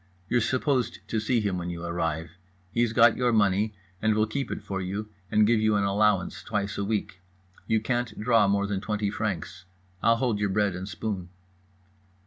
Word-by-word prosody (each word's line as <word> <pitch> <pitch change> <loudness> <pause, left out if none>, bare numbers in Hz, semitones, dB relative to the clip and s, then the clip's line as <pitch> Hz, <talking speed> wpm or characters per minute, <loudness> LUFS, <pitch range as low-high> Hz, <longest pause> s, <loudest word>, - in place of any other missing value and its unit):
You're 120 - +3
supposed 130 0 0
to 110 - 0
see 115 +2 +1
him 100 -3 -1
when 90 0 -4
you 85 -1 -5
arrive. 80 -1 -2 0.4
He's 120 +1 +1
got - - +5
your 125 -1 +2
money 105 -1 +2 0.3
and 110 0 +2
will 110 0 +3
keep 135 +5 -3
it - - -5
for 95 -2 -3
you, 100 +4 -4 0.2
and 105 +1 +4
give 115 +1 +3
you 110 0 +3
an 100 - +2
allowance 100 -3 +1
twice 100 -1 -2
a - - 0
week. 100 -3 -2 0.5
You 110 - +3
can't 120 0 -2
draw 115 -2 +4
more 100 0 +2
than 100 -1 -2
20 105 -1 -1
francs. 100 -3 -3 0.4
I'll 115 - +5
hold 115 -3 0
your 105 -1 +1
bread 100 -1 +1
and 95 +2 -5
spoon." 95 -1 -4
105 Hz, 190 wpm, -27 LUFS, 95-110 Hz, 0.5 s, got